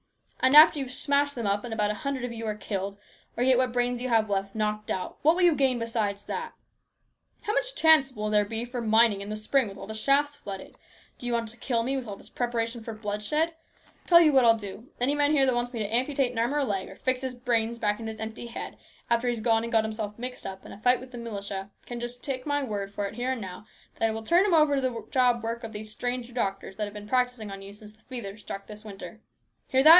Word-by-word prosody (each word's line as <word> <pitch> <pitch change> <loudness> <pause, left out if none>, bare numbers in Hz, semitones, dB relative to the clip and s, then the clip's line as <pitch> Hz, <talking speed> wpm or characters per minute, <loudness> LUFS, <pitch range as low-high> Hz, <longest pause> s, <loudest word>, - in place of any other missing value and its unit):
And 260 +2 +5
after 305 0 +9
you've 265 -2 -4
smashed 285 +2 +1
them 235 -3 -3
up 200 0 +1
and 240 - -6
about 210 -2 +1
a 210 - -6
hundred 275 -3 -2
of 245 - -5
you 225 -1 -5
are 215 - -1
killed, 200 -1 -4 0.4
or 245 - +2
get 255 -1 +5
what 255 - +3
few 245 - -10
brains 245 0 0
you 255 - -2
have 225 -2 +3
left 195 0 -2
knocked 215 0 -1
out, 185 -1 -3
what 320 +3 +5
will 365 - +1
you 350 -2 +6
gain 265 -3 +2
besides 220 -3 -2
that? - - -4 0.9
How 420 - -2
much - - 0
chance 315 -4 +6
will 215 -3 -3
there 210 -1 +4
be 225 +3 -3
for 245 0 -5
mining 220 -2 +4
in 200 - -6
the 215 - -3
spring 225 +4 +1
with 195 0 -9
all - - -7
the 220 - -6
shafts 280 +6 +2
flooded? 195 -7 -8 0.4
Do 245 - -6
you 240 - 0
want 230 -1 0
to 235 - -11
kill 235 -1 0
me 265 +3 -1
with 260 -3 -3
all 200 - -5
this - - -14
preparation 235 -1 -2
for 225 - -5
bloodshed? 215 +10 -1 0.5
Tell 340 -1 +8
you 310 -3 +5
what 265 -2 +6
I'll 230 -1 +6
do. 205 +3 -8
Any 255 +4 +3
man 290 0 +3
here 275 -3 +5
that 260 - +3
wants 240 0 -1
me 240 - -6
to 215 0 -1
amputate 260 0 +1
an 235 - -4
arm 240 +5 +1
or 295 - +2
leg, 200 -7 -2
or 190 - -11
fix 260 +3 -1
his 260 -1 -4
brains 235 -2 0
back 210 -2 0
into 225 -1 -4
his 220 - -10
empty 220 +2 -5
head 235 - -7 0.3
after 235 +1 +2
he's 240 -2 0
gone 225 0 +3
and 230 0 -4
got 225 -2 +4
himself 215 -1 -4
mixed 250 +1 -6
up 190 0 -8
in - - -10
a - - -10
fight 250 +1 +4
with 255 0 -11
the 245 - -7
militia, 200 -4 -5 0.2
can 240 -1 -6
just 240 +1 -6
take 265 -1 -4
my 290 -1 +1
word 200 -5 -3
for 205 0 -3
it 200 - -5
here 245 +3 -1
and 250 - -5
now, 190 +2 -8 0.3
that 225 - +3
I - - 0
will 220 0 -5
turn 345 - +4
him 355 - +4
over 305 -2 +5
to - - +1
the 235 -4 -2
job 245 -3 +3
work 230 +1 -3
of 225 - -6
these 215 0 -7
stranger 245 +2 -3
doctors 195 -4 -2
that 215 - -1
have 205 0 -9
been 210 0 -8
practising 250 -3 0
on 195 0 -7
you 195 +1 -10
since 210 0 -13
the 215 +1 -27
fever 235 -6 -7
struck 200 -2 -7
in - - -29
this 210 +1 -12
winter. 205 -2 -9 0.5
Hear 265 0 +3
that 310 - +9
235 Hz, 275 wpm, -27 LUFS, 210-255 Hz, 0.9 s, after